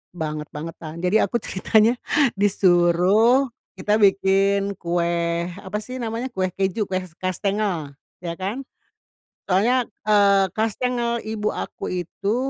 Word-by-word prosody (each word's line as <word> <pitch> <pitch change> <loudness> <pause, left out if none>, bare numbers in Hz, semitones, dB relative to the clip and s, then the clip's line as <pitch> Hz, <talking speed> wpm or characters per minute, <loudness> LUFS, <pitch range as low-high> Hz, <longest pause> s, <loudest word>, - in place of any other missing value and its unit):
banget-bangetan. 155 0 -6
Jadi 180 +4 +3
aku 240 - 0
ceritanya 220 +4 +2 0.4
disuruh 200 +6 +4 0.2
kita 210 +3 +1
bikin 195 0 +3
kue, 170 0 -1
apa 200 +1 -5
sih 255 +3 -7
namanya, 235 +2 -3
kue 190 -5 -1
keju, 195 +3 -1
kue 185 -1 -1
s 180 - -13
kastengel 185 -4 -2 0.3
iya 170 - -3
kan, 205 +8 -3 0.8
soalnya, 235 +7 +2 0.2
eee, 200 -2 +4
kastengel 235 +2 -1
ibu 215 -1 -2
aku - - -6
itu 185 +4 -2
195 Hz, 115 wpm, -22 LUFS, 175-220 Hz, 0.8 s, disuruh